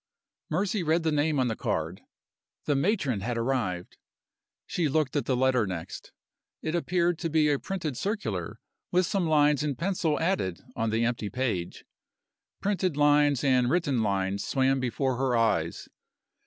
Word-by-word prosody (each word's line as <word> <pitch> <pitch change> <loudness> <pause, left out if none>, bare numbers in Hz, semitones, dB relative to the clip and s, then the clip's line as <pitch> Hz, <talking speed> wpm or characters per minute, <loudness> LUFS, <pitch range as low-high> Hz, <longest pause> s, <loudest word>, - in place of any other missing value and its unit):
Mercy 190 +5 0
read 165 +1 +1
the 160 - +1
name 150 0 +1
on 130 - +2
the 110 - -1
card. 80 0 -2 0.6
The 145 - +1
matron 140 - +1
had 120 +4 -2
arrived! 115 -8 -2 0.7
She 170 -3 0
looked 150 -1 0
at 140 -5 0
the 130 - +1
letter 130 -4 +2
next. 85 -3 -6 0.5
It 155 - -2
appeared 175 0 +1
to 165 - -2
be 155 -1 +3
a 140 - +1
printed 165 -8 -4
circular, 115 - -3 0.3
with 180 +1 +3
some 180 -1 0
lines 150 -2 +4
in 150 -2 -1
pencil 170 -3 0
added 165 - 0 0.2
on 115 -1 0
the 115 +2 +1
empty 115 -3 -2
page. 110 -7 -3 0.8
Printed 185 -6 0
lines 145 -2 +4
and 130 -3 +3
written 145 -7 +1
lines 100 -1 0
swam 135 0 +1
before 130 +1 -1
her 130 -2 +1
eyes. 85 -8 0
135 Hz, 155 wpm, -28 LUFS, 115-160 Hz, 0.8 s, lines